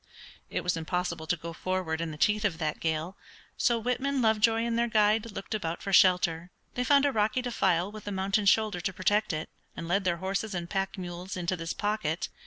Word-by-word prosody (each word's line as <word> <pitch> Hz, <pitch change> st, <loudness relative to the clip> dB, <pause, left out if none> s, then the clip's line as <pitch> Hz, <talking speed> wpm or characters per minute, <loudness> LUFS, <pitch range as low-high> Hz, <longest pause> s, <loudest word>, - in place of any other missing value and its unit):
It -, -, -2 dB
was 180 Hz, -1 st, +1 dB
impossible 165 Hz, 0 st, -3 dB
to 175 Hz, +1 st, +1 dB
go 165 Hz, +1 st, -7 dB
forward 175 Hz, -2 st, -2 dB
in 165 Hz, -, -2 dB
the 155 Hz, -, -7 dB
teeth 210 Hz, +6 st, +2 dB
of 195 Hz, -6 st, 0 dB
that 155 Hz, -3 st, -2 dB
gale, 160 Hz, +3 st, -2 dB, 0.4 s
so 240 Hz, -2 st, +2 dB
Whitman, 260 Hz, +4 st, -1 dB
Lovejoy, 225 Hz, 0 st, +3 dB
and 235 Hz, 0 st, -1 dB
their 235 Hz, +1 st, +2 dB
guide 215 Hz, 0 st, +2 dB
looked 195 Hz, +2 st, -6 dB
about 170 Hz, -6 st, -3 dB
for 195 Hz, -2 st, -3 dB
shelter. 180 Hz, -2 st, +4 dB, 0.2 s
They 250 Hz, -, -1 dB
found 280 Hz, +2 st, +4 dB
a 285 Hz, -, +3 dB
rocky 220 Hz, +2 st, +1 dB
defile 190 Hz, -6 st, +1 dB
with 215 Hz, -1 st, -10 dB
a -, -, -2 dB
mountain 195 Hz, +1 st, 0 dB
shoulder 210 Hz, -2 st, +3 dB
to 190 Hz, +2 st, -2 dB
protect 205 Hz, +4 st, +1 dB
it, 155 Hz, 0 st, -3 dB, 0.3 s
and 165 Hz, -, -5 dB
led 195 Hz, +3 st, +1 dB
their 175 Hz, -2 st, +1 dB
horses 195 Hz, +3 st, -2 dB
and 175 Hz, -1 st, -3 dB
pack 195 Hz, +1 st, -2 dB
mules 180 Hz, +1 st, -6 dB
into 180 Hz, +1 st, -1 dB
this 165 Hz, -1 st, -4 dB
pocket. 205 Hz, -6 st, -1 dB
190 Hz, 210 wpm, -29 LUFS, 170-215 Hz, 0.4 s, shelter